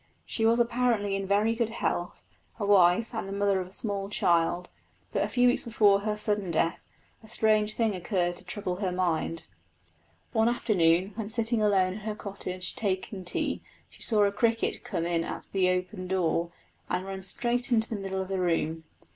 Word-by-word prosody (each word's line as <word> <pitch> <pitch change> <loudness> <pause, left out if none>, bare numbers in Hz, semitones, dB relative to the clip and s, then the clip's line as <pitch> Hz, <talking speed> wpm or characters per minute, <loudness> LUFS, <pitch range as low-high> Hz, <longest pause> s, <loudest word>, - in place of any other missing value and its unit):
She 225 -1 0
was 230 +1 +3
apparently 235 -4 +1
in 195 0 -3
very 210 +3 +2
good 230 -1 -1
health, 175 -6 -3 0.4
a 205 - -1
wife, 200 +3 +4
and 220 -4 -3
the - - -6
mother 200 -1 +1
of 180 - -6
a - - -16
small 200 -2 -3
child; 175 -3 +1 0.4
but - - 0
a - - 0
few 245 0 +3
weeks 245 - +3
before 210 -4 +3
her 210 +1 -2
sudden 210 -3 -1
death 165 0 +1 0.4
a 220 - -15
strange 215 -1 +2
thing 225 -3 +1
occurred 175 -1 -1
to 180 - -10
trouble 180 0 -4
her 190 -2 -1
mind. 170 -2 -1 0.9
One 220 +1 +3
afternoon, 185 -6 +2
when 210 0 -5
sitting 225 0 +1
alone 190 -3 +3
in 205 - -7
her 215 0 -4
cottage 185 -3 -2
taking 195 -4 -2
tea, 175 - -1 0.3
she - - -14
saw 215 -3 +5
a 200 - +3
cricket 225 +2 0
come 165 - -3
in 170 -1 0
at - - -4
the 185 -2 +3
open 185 +1 -2
door, 170 -2 0 0.4
and 185 - -1
run 195 0 -6
straight 245 +6 0
into 220 -2 +3
the 225 - -4
middle 190 -1 -2
of - - -9
the 190 -1 -1
room. 165 -2 -1
200 Hz, 190 wpm, -28 LUFS, 180-220 Hz, 0.9 s, saw